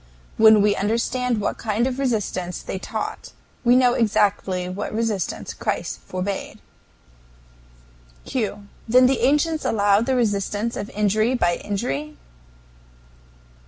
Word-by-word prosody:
When 220 Hz, -2 st, +7 dB
we 205 Hz, -1 st, +3 dB
understand 230 Hz, +3 st, 0 dB
what 205 Hz, -, -2 dB
kind 220 Hz, +1 st, 0 dB
of 260 Hz, 0 st, -2 dB
resistance 210 Hz, -8 st, -2 dB
they 190 Hz, -, -5 dB
taught, -, -, -5 dB, 0.3 s
we 245 Hz, 0 st, +5 dB
know 250 Hz, -1 st, +4 dB
exactly 200 Hz, -5 st, +1 dB
what 185 Hz, +3 st, -4 dB
resistance 215 Hz, -5 st, -2 dB
Christ -, -, -3 dB
forbade. 190 Hz, +2 st, -4 dB, 1.7 s
Q. 205 Hz, -4 st, -3 dB, 0.2 s
Then 250 Hz, +3 st, +6 dB
the 260 Hz, +1 st, +2 dB
ancients 300 Hz, +3 st, +2 dB
allowed 205 Hz, +1 st, +2 dB
the 265 Hz, -, +2 dB
resistance 210 Hz, -1 st, -1 dB
of 205 Hz, -, -5 dB
injury 215 Hz, +4 st, +1 dB
by 175 Hz, -7 st, +1 dB
injury? 150 Hz, -7 st, -4 dB
215 Hz, 120 wpm, -22 LUFS, 200-245 Hz, 1.7 s, When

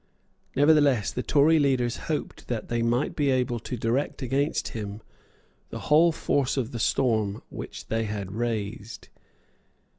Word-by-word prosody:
Nevertheless, 145 Hz, -5 st, +4 dB
the 125 Hz, -, -3 dB
Tory 155 Hz, +4 st, +4 dB
leaders 130 Hz, -4 st, +1 dB
hoped 155 Hz, -, -3 dB
that 115 Hz, -3 st, -4 dB
they 120 Hz, 0 st, 0 dB
might 120 Hz, +3 st, 0 dB
be 145 Hz, -2 st, +1 dB
able 125 Hz, -2 st, +1 dB
to 125 Hz, +2 st, -5 dB
direct 120 Hz, +5 st, -1 dB
against 135 Hz, +4 st, 0 dB
him 105 Hz, -1 st, -6 dB, 0.7 s
the -, -, -6 dB
whole 165 Hz, +3 st, +6 dB
force 140 Hz, -4 st, 0 dB
of 125 Hz, -1 st, -1 dB
the 120 Hz, -, -5 dB
storm 110 Hz, -3 st, +1 dB
which -, -, -7 dB
they 115 Hz, 0 st, -1 dB
had 100 Hz, -3 st, -4 dB
raised. 110 Hz, 0 st, -4 dB
120 Hz, 145 wpm, -26 LUFS, 110-140 Hz, 0.7 s, whole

